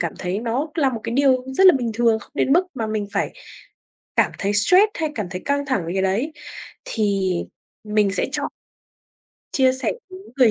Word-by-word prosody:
cảm 170 -2 -1
thấy 180 +2 -2
nó 240 +6 -2
là 280 -5 +2
một 230 -3 -5
cái 230 - -3
điều 260 -2 +3
rất 385 - +5
là 360 - +7
bình 240 -2 -2
thường, 230 -1 +3
không - - -13
đến 275 - +1
mức 355 +4 +4
mà 225 -3 -3
mình 215 -1 -2
phải - - -1 0.8
cảm - - +3
thấy 200 +1 -1
stress 365 - +5
hay 315 -2 -2
cảm 210 -7 -3
thấy 180 0 -6
căng 285 0 0
thẳng 260 - 0
với 170 - -4
cái 190 - 0
đấy, 210 +11 0 0.5
thì 200 -4 0 0.5
mình 210 -1 +2
sẽ - - +2
chọn - - -1 1.0
chia 260 -1 +3
sẻ 260 - 0 0.2
đúng 375 +2 -11
người 250 -4 +5
235 Hz, 205 wpm, -22 LUFS, 205-280 Hz, 1.0 s, là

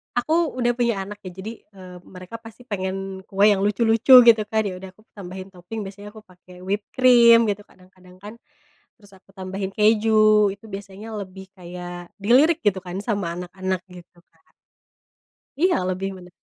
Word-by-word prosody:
aku 245 +6 0 0.2
udah 240 -1 +1
punya 235 -5 0
anak 205 +1 -10
ya - - -5
jadi, 215 +4 -6 0.2
eee, 185 -1 -12
mereka 185 +4 -11
pasti 225 +2 -14
pengen 195 -3 -5
kue 200 +1 +2
yang 195 - 0
lucu-lucu 225 +4 +3
gitu 230 -2 +6
kan, 220 0 0
ya 195 -2 -4
udah 190 0 -10
aku 215 - -24
tambahin 190 -1 -9
toping 185 +5 -7
biasanya 205 +1 -10
aku 215 -1 -14
pake 180 -1 -17
whipped 200 +2 -3
cream 235 -2 +6
gitu 205 0 -3
kadang-kadang 185 0 -20
kan. 210 - -9 0.6
Terus, 205 -4 -20
aku 190 - -32
tambahin 190 +1 -5
keju, 215 -1 +4
itu 205 - -20
biasanya 200 +2 -9
lebih 190 0 -10
kayak 175 -1 -9
dilirik 280 +11 +4
gitu 195 -2 +1
kan, 180 0 -8
sama 200 -6 -2
anak-anak, 185 +1 -4
gitu, 175 -1 -15
Kak. 160 -1 -34 1.1
Iya, 360 +3 +2
lebih 185 +1 -3
mene 180 -1 -14
195 Hz, 170 wpm, -22 LUFS, 185-220 Hz, 1.1 s, gitu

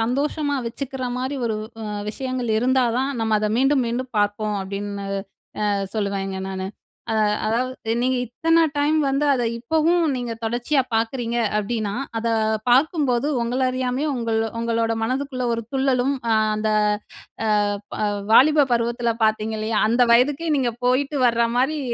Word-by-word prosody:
சந்தோஷமா 285 +4 0
வச்சுக்கிற 260 +2 -5
மாரி 260 +3 -2
ஒரு 220 -1 -1 0.3
அ - - -5 0.3
விஷயங்கள் 255 -2 -2
இருந்தா 255 +2 +2
தான் 270 +2 0
நம்ம 220 -1 +2
அதை 210 0 0
மீண்டும், 270 0 +3
மீண்டும் 250 0 -4
பார்ப்போம், 205 0 0
அப்படின்னு 200 +1 -5 0.6
அ - - +2 0.2
சொல்லுவேங்க 195 -2 -2
நானு. 190 0 -4 0.4
அத 220 -1 +1 0.3
அதாவது 235 0 -1
நீங்க 255 +1 +1
இத்தனை 330 +7 +2
டைம் 295 +2 +2
வந்து 275 +2 +1
அதை 245 -2 0
இப்பவும் 320 +7 +2
நீங்க 245 -2 -3
தொடர்ச்சியா 240 +5 +1
பார்க்குறீங்க 230 +1 -1 0.2
அப்படினா, 210 -1 -1 0.3
அதை 230 0 0 0.4
பார்க்கும்போது 275 -1 +3 0.2
உங்கள 245 +3 -1
அறியாமலே 255 +3 -1
உங்கள் 230 -2 -1 0.2
உங்களோட 230 0 0
மனதுக்குள்ளே 255 +1 -2
ஒரு 230 - -2
துள்ளலும் 265 -1 +1 0.2
அ - - +4 0.2
அந்த 215 0 -1 1.0
அ - - 0 0.3
ப - - -4 0.4
வாலிப 295 +4 +6
பருவத்தில 235 0 +1
பார்த்திங்க 220 0 0
இல்லையா, 215 0 -1
அந்த 240 +2 +4
வயதுக்கே 285 +7 +3
நீங்க 250 -3 0
போயிட்டு 275 +3 +1
வர்ற 235 -1 +3
மாரி 275 +5 +1
245 Hz, 140 wpm, -22 LUFS, 225-270 Hz, 1.0 s, வாலிப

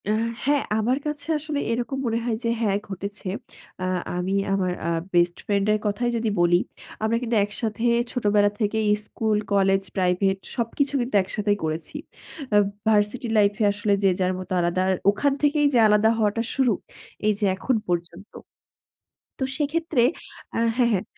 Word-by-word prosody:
অ্যা 210 - +2 0.3
হ্যাঁ, 285 0 +3 0.2
আমার 240 +4 +1
কাছে 295 0 -4
আসলে 300 -1 -3
এরকম 245 +3 -2
মনে 230 -1 0
হয় 230 -2 0
যে 230 - 0
হ্যাঁ, 200 -3 +2
ঘটেছে। 200 +1 -6 0.5
অ্যা 185 - -2 0.3
আমি 180 +2 -1 0.2
আমার 185 -2 +1 0.2
আ - - +1 0.2
বেস্ট 175 0 +3
ফ্রেন্ডের 205 +1 +2
কথাই 210 +4 0
যদি 225 -1 0
বলি। 175 0 +4 0.4
আমরা 225 +1 +2
কিন্তু 240 -1 -1
একসাথে 215 +2 -4 0.3
ছোটবেলা 205 -3 +3
থেকেই 215 0 0 0.2
স্কুল, 220 -2 -1 0.2
কলেজ, 195 -1 +3 0.2
প্রাইভেট 190 +1 +2 0.2
সবকিছু 265 +4 -1
কিন্তু 240 -2 -3
একসাথেই 205 +2 -1
করেছি। 160 - -4 0.6
অ্যা 205 - +6 0.3
ভার্সিটি 220 +4 +2
লাইফে 205 +1 +3
আসলে 205 0 0
যে 195 - +5
যার 185 0 +1
মতো 185 0 -9
আলাদা। 175 +1 +1
আর - - +3 0.2
ওখান 280 +7 +1
থেকেই 295 0 +3
যে - - +4
আলাদা 210 +1 +4
হওয়াটা 220 +1 +1
শুরু, 260 -5 +3 0.5
এই 215 - +4
যে 210 - +1
এখন 245 +7 0
পর্যন্ত। 175 +3 -4 1.1
তো - - +1
সেক্ষেত্রে 310 -2 0 0.5
আ - - 0 0.2
হ্যাঁ, 245 -2 +3
হ্যাঁ, 190 -3 0
210 Hz, 160 wpm, -24 LUFS, 195-240 Hz, 1.1 s, অ্যা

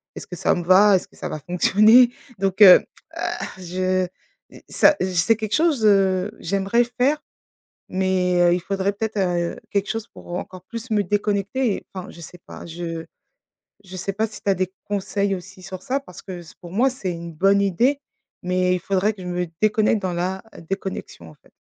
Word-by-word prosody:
est-ce - - -8
que 180 - -7
ça - - +1
me 175 - -3
va? 190 +3 +6
Est-ce - - -7
que - - -24
ça - - -6
va 155 - -5
fonctionner? 215 - +5 0.3
donc 195 +1 -1
heu 185 -3 +9 0.3
heu, - - -5 0.4
je 185 0 -1 0.4
i - - -14
ça, 300 - +5
c'est 185 - +1
j 185 - -5
c'est 220 +7 +4
quelque 215 -1 -2
chose, 310 -8 +2
heu, 195 -1 +3
j'aimerais 195 +6 +1
faire, 255 +6 0 0.7
mais 185 -1 +1
heu, 175 0 +5
il 180 - -1
faudrait 195 +2 -1
peut-être, 220 0 -3
heu, 175 -3 -1
quelque 200 0 -1
chose 225 0 -4
pour 175 - -10
encore 185 0 -7
plus 230 +4 -8
me 210 -2 +2
déconnecter, 205 +4 0
et - - -11
enfin 185 -1 -7
je 170 - -13
sais 180 - -11
pas, - - -10
je 165 -1 -5 0.8
je 185 0 -10
sais 195 +2 -3
pas 215 +3 0
si 215 - -12
tu 200 - -2
as 195 - +3
des 185 +1 -2
conseils 200 0 -1
aussi 185 +1 -11
sur 185 0 -8
ça 270 +2 -1
parce 180 -10 -13
que 185 -2 -7
c 165 - -14
pour 175 -1 -11
moi, 245 +7 +3
c'est 200 -8 -4
une 170 -1 -7
bonne 195 +5 +3
idée, 240 +9 +1 0.4
mais 180 0 +1
il - - -2
faudrait 195 +4 0
que 195 - -12
je 180 - -7
me 180 0 -1 0.2
déconnecte 215 0 +2
dans 185 -2 -2
la 185 +2 -2 0.3
déconnexion, 190 - -5
en 75 - -16
fait. - - -27
190 Hz, 210 wpm, -22 LUFS, 180-210 Hz, 0.8 s, heu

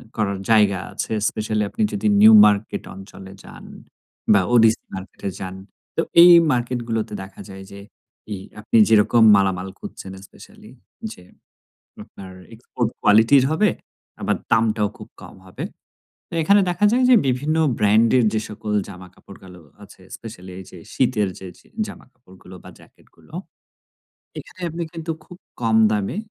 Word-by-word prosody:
করার 100 -2 -2
জায়গা 105 -4 +3
আছে। - - -5 0.2
স্পেশালি 110 0 -3
আপনি - - -6
যদি 205 +1 -2
নিউ 220 +1 +8
মার্কেট 105 +1 0
অঞ্চলে 95 0 -12
যান, - - -13 0.7
বা 100 - +4
ওডিসি 115 -1 +4
মার্কেটে 95 +1 -7
যান, 95 0 -7 0.4
তো - - +1 0.2
এই 175 +1 +9 0.2
মার্কেট 125 0 -2
গুলোতে 110 -2 -3
দেখা 95 - -13
যায় 95 0 -10
যে 100 - -11 0.5
এই 100 - -4 0.2
আপনি 110 +2 0
যেরকম 110 +1 +4
মালামাল 95 -1 0
খুঁজছেন, 95 - -10
স্পেশালি - - -17 0.4
যে 90 - -13 0.8
আপনার 95 -1 -13 0.2
এক্সপোর্ট 115 0 -4
কোয়ালিটির 115 +6 +5
হবে 205 +7 +2 0.5
আবার - - 0 0.2
দামটাও 110 -2 +2
খুব - - -12
কম - - -13
হবে। 90 - -8 0.7
তো - - -14
এখানে 200 +6 +4
দেখা 180 +4 0
যায় 250 +2 +2
যে 255 - +7
বিভিন্ন 140 +5 -1 0.2
ব্র্যান্ডের 110 +4 +3
যে 110 - 0
সকল 105 0 -7 0.2
জামা 95 -2 -11
কাপড় 100 - -16
গুলো 90 -2 -14 0.2
আছে, 100 -1 -17 0.2
স্পেশাল 105 -5 -11
এই 95 - -9
যে - - -12 0.2
শীতের 120 -6 0
যে, 95 - -9
যে - - -24 0.2
জামাকাপড়গুলো 95 - -15
বা - - -12
জ্যাকেট - - -22
গুলো। - - -23 1.1
এখানে 185 - -13
আপনি 170 +2 -6
কিন্তু 165 -1 -7
খুব 180 - -14 0.3
কম 115 -1 +1
দামে 105 - -2
110 Hz, 150 wpm, -21 LUFS, 95-125 Hz, 1.1 s, এই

